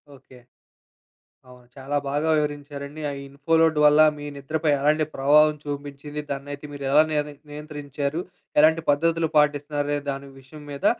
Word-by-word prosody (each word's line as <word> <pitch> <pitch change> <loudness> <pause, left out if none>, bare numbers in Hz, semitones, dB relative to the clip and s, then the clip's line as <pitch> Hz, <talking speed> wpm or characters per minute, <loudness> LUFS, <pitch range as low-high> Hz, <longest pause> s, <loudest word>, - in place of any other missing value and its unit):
Okay. 130 -1 -18 1.1
అవును. 125 -1 -17
చాలా 140 +1 -3
బాగా 145 +3 0
వివరించారండి. 145 0 -4
ఆ - - -3
ఇన్‌‌ఫో‌లోడ్ 160 +3 +1
వల్ల 150 0 +6 0.2
మీ 145 - -8
నిద్రపై 155 +2 -1
ఎలాంటి 150 +2 +2
ప్రభావం 150 +3 +5
చూబించింది, 145 +1 -6
దాన్నైతే 140 +1 -6
మీరెలా 140 +1 +3
నియన్ 150 -1 0 0.2
నియంత్రించారు, 145 0 -5 0.4
ఎలాంటి 160 +2 +5
పద్ధతులు 165 +3 +2
పాటిస్తున్నారనె 145 0 +1
దాని 140 0 -7
విషయం 140 +3 -13
మీద 140 - -6
145 Hz, 125 wpm, -24 LUFS, 140-150 Hz, 1.1 s, వల్ల